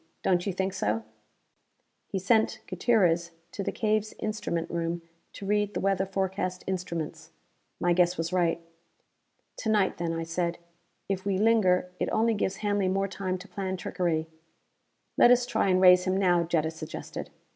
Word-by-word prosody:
Don't 180 +1 +2
you - - +1
think 190 +1 -2
so?" 110 - -1 1.0
He - - -3
sent 220 +3 +2
Gutierrez 180 -4 +2 0.2
to - - -5
the - - -2
cave's 215 -1 0
instrument 210 -6 -2
room 170 0 -2 0.3
to 200 - -8
read 205 0 0
the - - 0
weather 195 0 +1
forecast 190 -1 -2
instruments. 170 -4 -4 0.5
My 175 0 +2
guess 180 0 +3
was 165 +2 -2
right. 170 -2 +2 1.0
"To 220 - -3
night 205 -4 +2
then," 170 -1 -1
I 165 0 -2
said. 170 +1 -2 0.5
"If 190 -1 -2
we 200 -2 0
linger, 190 -4 +3
it - - 0
only 225 +1 +2
gives 195 -2 -1
Hanley 205 -2 +1
more 195 +1 +1
time 190 -1 -3
to 185 +2 -12
plan 190 -2 -3
trickery." 170 -3 -1 0.9
"Let - - +8
us 245 0 +5
try 220 -4 0
and 185 -1 +3
raise 180 -1 +7
him 185 0 +1
now," 175 -3 +3
Jetta 160 -1 0
suggested. 160 - -7
185 Hz, 165 wpm, -28 LUFS, 175-200 Hz, 1.0 s, Let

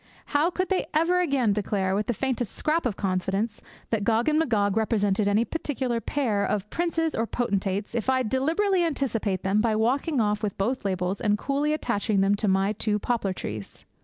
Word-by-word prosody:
How 295 +4 +3
could 370 +1 -2
they 380 - 0
ever 340 +3 +3
again 270 - +2
declare, 195 -2 -1
with 205 +2 -1
the 240 - 0
faintest 250 -2 -2
scrap 315 -2 +1
of 210 - -4
confidence, 195 +3 -1 0.3
that 220 -3 +1
Gog 225 +2 +2
and 305 0 +3
Magog 210 -10 +1
represented 210 -2 +1
any 210 +3 +3
particular 260 -7 -2
pair 225 -9 0
of 210 0 -1
princes 330 -2 0
or 225 - -1
potentates 200 -4 -1
if 235 +1 -1
I 260 0 +3
deliberately 330 - +1
anticipate 235 - -1
them 200 +2 +2
by 225 -1 +1
walking 260 +6 +1
off 210 -1 +1
with 210 -3 -3
both 230 +4 -1
labels 185 0 -1
and 210 -1 +2
coolly 285 +5 0
attaching 220 -8 0
them 195 +1 +3
to 210 - -1
my 195 +2 +2
two 210 0 0
poplar 215 -2 -1
trees? 105 - -7
225 Hz, 190 wpm, -26 LUFS, 200-275 Hz, 0.3 s, How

